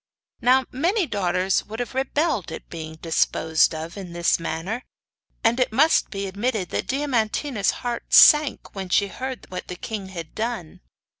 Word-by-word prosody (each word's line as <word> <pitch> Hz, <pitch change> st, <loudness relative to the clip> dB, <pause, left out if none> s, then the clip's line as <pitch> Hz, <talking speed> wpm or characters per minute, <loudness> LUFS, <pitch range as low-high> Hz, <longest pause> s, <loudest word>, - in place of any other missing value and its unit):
Now 255 Hz, +2 st, +4 dB
many 350 Hz, -, +1 dB
daughters 190 Hz, -, 0 dB
would 220 Hz, +2 st, -7 dB
have 245 Hz, -3 st, -4 dB
rebelled 265 Hz, -, 0 dB
at -, -, -9 dB
being 160 Hz, -1 st, -7 dB
disposed 160 Hz, 0 st, +1 dB
of 160 Hz, +4 st, -6 dB
in 185 Hz, -3 st, -7 dB
the 170 Hz, 0 st, +2 dB
manner; 165 Hz, +8 st, -3 dB, 0.6 s
and 235 Hz, +2 st, +3 dB
it 255 Hz, -, +2 dB
must 295 Hz, +8 st, +3 dB
be 200 Hz, -1 st, -4 dB
admitted 200 Hz, -1 st, -2 dB
that -, -, -3 dB
Diamantina's 255 Hz, -3 st, 0 dB, 0.2 s
heart 240 Hz, -1 st, -4 dB
sank 300 Hz, -2 st, +6 dB
when 190 Hz, -2 st, -6 dB
she 200 Hz, +2 st, +2 dB
heard 260 Hz, +4 st, -6 dB
what 180 Hz, -, -6 dB
the 180 Hz, -, -6 dB
king 205 Hz, +1 st, -5 dB
had 170 Hz, -4 st, -8 dB
done. 220 Hz, -7 st, -4 dB
210 Hz, 160 wpm, -23 LUFS, 180-255 Hz, 0.6 s, sank